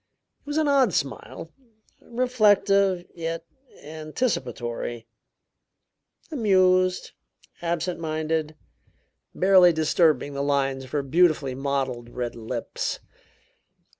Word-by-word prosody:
It - - -37
was 295 +1 -2
an 310 -1 +2
odd 270 - +3
smile, 140 +3 -4 0.5
reflective, 205 -6 +2
yet 165 0 -4 0.4
anticipatory; 135 - -4 1.3
amused, 185 -7 +2 0.5
absent 170 +1 -2
minded, 155 -1 -2 0.8
barely 185 -2 +6
disturbing 155 -2 +2
the 140 - -3
lines 135 -2 0
of - - -14
her 145 -2 0
beautifully 150 -2 +2
modeled 135 -3 -3
red 120 0 -4
lips. 115 +1 -4
160 Hz, 90 wpm, -25 LUFS, 140-185 Hz, 1.3 s, barely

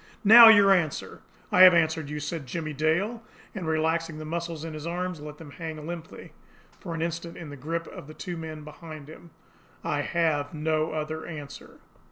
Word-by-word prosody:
Now 225 +3 +10
your 205 -3 +7
answer!" 165 -6 -2 0.3
"I 180 - +5
have 185 -1 +10
answered 160 -2 +1
you," 150 0 -4
said 150 -1 -5
Jimmie 155 +2 -4
Dale 170 - 0 0.3
and, 185 -5 -5
relaxing 160 0 0
the 155 - -7
muscles 165 0 -4
in 160 - -6
his 155 +1 -7
arms, 180 0 -3
let 150 0 -9
them 150 -3 -12
hang 160 -1 -7
limply 165 -1 -8 0.5
for 170 -4 -6
an 165 - -2
instant 170 0 -5
in 165 -4 -8
the - - -8
grip 165 +5 -4
of - - -11
the 155 - -11
two 180 -2 -6
men 160 -2 -7
behind 155 -1 -10
him. 160 +2 -13 0.5
"I 145 - -1
have 155 -2 -1
no 155 0 0
other 155 0 -4
answer." 145 -4 -10
160 Hz, 190 wpm, -26 LUFS, 155-170 Hz, 0.5 s, Now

